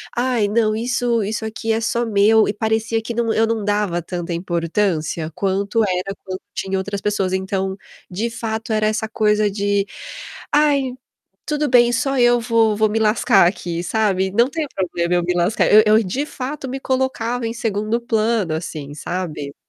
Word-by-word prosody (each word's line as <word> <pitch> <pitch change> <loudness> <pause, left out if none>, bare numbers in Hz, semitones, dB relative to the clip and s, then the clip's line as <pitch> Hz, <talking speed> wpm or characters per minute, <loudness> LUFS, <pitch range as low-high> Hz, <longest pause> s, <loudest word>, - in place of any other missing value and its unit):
ai 245 -3 +1
não 215 0 +2
isso 235 0 0
isso 215 +2 -3
aqui 220 0 -2
é 225 - -1
só 235 +1 0
meu". 215 0 +4
E 205 - -1
parecia 220 +1 0
que 230 +2 -5
não 230 -1 0
eu 225 - +3
não 225 -2 -2
dava 205 -4 0
tanta 175 0 -5
importância 170 -1 -1
quanto 200 +3 0
era 190 0 -2
quando 185 -1 -5
tinha 190 0 -2
outras 200 +1 -3
pessoas, 195 -3 -1
então, 190 0 -1 0.3
de 210 +6 -2
fato 225 -1 -4
era 215 0 +2
essa 220 0 -1
coisa 210 -1 +2
de: 200 0 0 0.7
"Ai, 285 -3 +3 0.6
tudo 300 0 0
bem 240 -1 +5
só 270 +2 0
eu 240 0 +5
vou 225 -2 +2
vou 215 +1 +2
me 225 +2 0
lascar 215 -3 +4
aqui, 175 -2 -3
sabe? 190 -1 0
Não 235 +5 +3
tem 315 0 -3
problema 175 -2 -1
eu 175 - +1
me 180 - 0
lascar". 175 +5 +1
Eu 215 +1 +9
eu 215 +1 +5
de 250 +10 -2
fato 270 -1 -6
me 265 - -3
colocava 250 -3 -1
em 225 - -3
segundo 225 0 -1
plano 220 -6 0
assim, 155 -3 -5
sabe. 155 -3 -5
215 Hz, 175 wpm, -20 LUFS, 190-235 Hz, 0.7 s, Eu